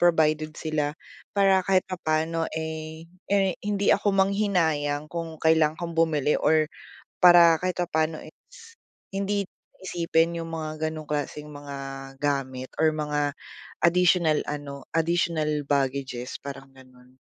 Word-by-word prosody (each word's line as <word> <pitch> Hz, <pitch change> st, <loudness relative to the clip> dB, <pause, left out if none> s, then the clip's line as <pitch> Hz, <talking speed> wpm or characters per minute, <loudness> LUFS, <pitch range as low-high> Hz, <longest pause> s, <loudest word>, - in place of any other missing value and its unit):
provided 155 Hz, -3 st, +3 dB
sila. 155 Hz, -1 st, -2 dB, 0.4 s
Para 195 Hz, -1 st, +5 dB
kahit 185 Hz, 0 st, +2 dB
papaano, 165 Hz, -2 st, -1 dB
eh, 160 Hz, 0 st, -5 dB, 0.2 s
eh, 195 Hz, -1 st, +2 dB
hindi 205 Hz, -1 st, +2 dB
ako 200 Hz, -1 st, +1 dB
manghinayang 165 Hz, -7 st, +1 dB
kung 165 Hz, -2 st, -4 dB
kailangan 160 Hz, -1 st, +3 dB
kong 170 Hz, 0 st, -5 dB
bumili 150 Hz, -3 st, +2 dB
or 155 Hz, 0 st, +4 dB, 0.5 s
para 175 Hz, -2 st, +7 dB
kahit 180 Hz, +1 st, -2 dB
papaano 160 Hz, -2 st, 0 dB
is, 460 Hz, -2 st, -16 dB, 0.3 s
hindi 200 Hz, 0 st, -2 dB, 0.3 s
isipin 170 Hz, -2 st, +1 dB
'yong 165 Hz, -, -4 dB
mga 155 Hz, -1 st, -4 dB, 0.2 s
ganong 155 Hz, -1 st, -8 dB
klaseng 150 Hz, 0 st, -3 dB
mga 145 Hz, -1 st, -9 dB, 0.5 s
gamit 130 Hz, -3 st, -2 dB
or 160 Hz, 0 st, +4 dB
mga 150 Hz, -1 st, -1 dB, 0.5 s
additional 170 Hz, -2 st, +4 dB
ano, 140 Hz, -2 st, -6 dB
additional 165 Hz, -1 st, +1 dB, 0.2 s
baggages 135 Hz, -3 st, -1 dB
parang 135 Hz, -1 st, -9 dB
gano'n. 130 Hz, 0 st, -19 dB
160 Hz, 120 wpm, -26 LUFS, 150-175 Hz, 0.5 s, para